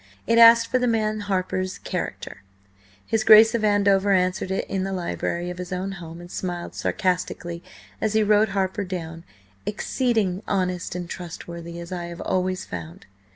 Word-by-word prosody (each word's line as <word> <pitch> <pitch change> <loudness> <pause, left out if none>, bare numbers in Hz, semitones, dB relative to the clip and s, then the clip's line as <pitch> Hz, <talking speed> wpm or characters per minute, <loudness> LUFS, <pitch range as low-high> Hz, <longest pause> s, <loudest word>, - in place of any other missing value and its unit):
It 230 0 +3
asked 230 0 +8
for 255 - +3
the 250 - +1
man 215 -2 0
Harper's 185 -2 -2
character. - - -5 0.6
His 225 -1 0
Grace 220 +1 +8
of 230 -2 0
Andover 200 -1 +3
answered 185 0 +1
it 190 - -2
in 190 -1 -2
the 195 0 -3
library 175 -1 -3
of 180 - -9
his 180 0 -6
own 185 +2 -2
home, 170 -3 -9
and 175 0 -11
smiled 175 -2 -4
sarcastically 180 -2 -2 0.4
as 215 -1 0
he 220 0 +3
wrote 210 +1 +4
Harper 195 +1 -1
down 165 -3 -6 0.4
"exceeding 210 -4 0
honest 180 -3 -1
and 180 -1 -4
trustworthy, 170 -1 -7
as 170 +1 -9
I 175 -1 -4
have 170 0 -8
always 185 0 -1
found." 85 -2 -8
185 Hz, 165 wpm, -24 LUFS, 175-210 Hz, 0.6 s, asked